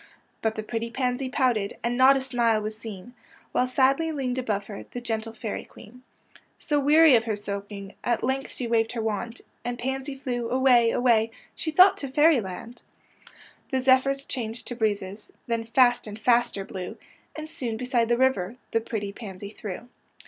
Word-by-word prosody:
But 220 0 0
the 215 - -4
pretty 230 +1 -3
pansy 255 +1 -1
pouted, 245 -6 0
And 235 +1 0
not 260 +2 +6
a - - -2
smile 240 -4 +1
was 215 0 -4
seen, 215 0 -9 0.4
Wliile 250 - +2
sadly 270 +5 +2
leaned 260 -4 -2
above 210 -5 -2
her 205 -1 -8
The 245 - -6
gentle 225 -2 -3
Fairy 220 -1 -5
Queen. 250 +5 -15 0.6
So, 295 -1 0
weary 300 +2 +6
of 225 -1 +2
her 220 -2 -1
sulking. 200 -1 -6
At 240 -1 0
length 265 +1 -1
she 250 - -5
waved 230 -1 +1
her 235 - -2
wand; 225 +2 -3 0.2
And 240 0 -3
pansy 265 +2 -3
flew 245 -3 -3
away, 250 -2 +4
away, 230 -2 +3 0.2
She 320 - -3
thought 365 +5 +6
to 280 - -4
Fairy 295 0 +4
land. 200 +5 -8 0.9
THE 265 - 0
FOOLISH 255 - -6
PANSY 265 - +6 0.2
83 - - +3
The - - -14
zephj^rs 275 - -15
changed 230 -2 -4
to 245 - -4
breezes, 205 -2 -2
Then 230 -1 -2
fast 245 0 +3
and 210 0 -7
faster 235 -4 +2
blew, 185 -2 -7 0.4
And 310 0 -6
soon 240 -7 -4
beside 245 -1 0
the 240 - +3
river 245 -6 +1 0.2
The 225 - +1
pretty 205 -3 -4
pansy 200 -2 -8
threw. 215 +2 -7
235 Hz, 190 wpm, -26 LUFS, 220-260 Hz, 0.9 s, not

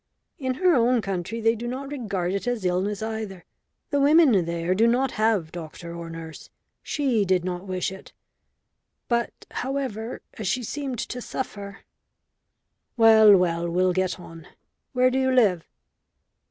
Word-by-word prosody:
"In 260 -2 -1
her 365 +4 +3
own 245 -2 +3
country 195 +2 -3
they 225 +1 +4
do 235 +1 -5
not 270 +3 -5
regard 200 -10 -2
it 200 +4 -3
as 240 -5 -1
illness 195 +4 0
either. 220 -4 -5 0.5
The 285 - +2
women 280 - +5
there 170 +1 -1
do 220 +5 +3
not 250 +2 +2
have 215 -7 +1
doctor 170 0 -8
or 170 -1 -7
nurse. 165 -1 -9 0.3
She 260 -8 0
did 185 -2 +1
not 180 +1 -4
wish 185 0 -2
it. 190 - -11 1.0
But, 235 -1 -2
however, 255 -4 -4 0.2
as 215 - -3
she 245 +6 0
seemed 270 +1 -4
to 250 +3 -4
suffer 200 -6 -6 0.6
" - - -54
"Well, 220 -3 +8
well. 170 -1 0
We'll 180 +1 +2
get 185 -1 -1
on. 165 -2 -12 0.5
Where 255 0 +3
do 260 - +1
you 260 0 +2
live?" 205 -10 +3
215 Hz, 155 wpm, -25 LUFS, 180-250 Hz, 1.0 s, Well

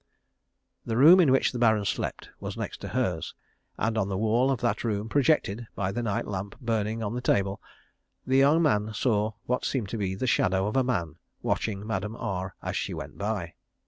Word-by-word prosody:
The 115 - -2
room 165 +8 +8
in 160 -7 +5
which 135 - +3
the 125 - -4
Baron 110 -3 +3
slept - - -3
was - - -6
next - - -5
to - - -5
hers, - - -2 0.4
and 110 0 0
on 100 -2 0
the 95 - -2
wall 115 +5 +2
of 135 -3 0
that 120 - 0
room, 105 -2 -1
projected 120 -5 +1
by 95 -1 -1
the 120 - -2
night 110 -4 -1
lamp 100 0 -5
burning 115 -2 -1
on 105 +1 -2
the 125 - -3
table, 100 -4 +1 0.6
the 130 +1 +2
young 145 +5 +5
man 105 -7 +1
saw 110 -2 +1
what 125 +1 -1
seemed 120 -8 -1
to 115 - -4
be 95 -2 -1
the 115 - -2
shadow 95 -5 +2
of 105 - -2
a 130 - +4
man 85 - -2 0.3
watching 105 -2 -1
Madame 105 0 -3
R 95 -3 -4
as 95 0 -3
she 95 -1 -2
went 75 +1 -8
by. 100 -5 -2
110 Hz, 205 wpm, -27 LUFS, 100-120 Hz, 0.6 s, room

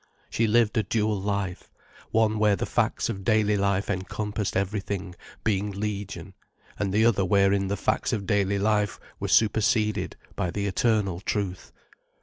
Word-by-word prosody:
She 115 - +1
lived 110 0 +3
a - - +4
dual 105 -2 0
life, 100 -2 -3 0.4
one 110 -1 +2
where 105 -1 +4
the - - -2
facts - - 0
of 95 - -4
daily 110 -2 +3
life 100 0 +1
encompassed 105 +1 -2
everything, 100 -1 -2 0.3
being 105 -1 0
legion, 100 -2 -5 0.5
and 100 -2 0
the 110 +3 +3
other 110 -4 +3
wherein 100 0 +3
the 100 +1 -1
facts - - 0
of 100 -2 -2
daily 100 -1 +1
life 105 -1 +1 0.2
were - - -2
superseded 110 0 +2 0.2
by 90 - -1
the 100 +3 -2
eternal 100 -2 +1
truth. 100 -2 -3
100 Hz, 150 wpm, -26 LUFS, 100-105 Hz, 0.5 s, a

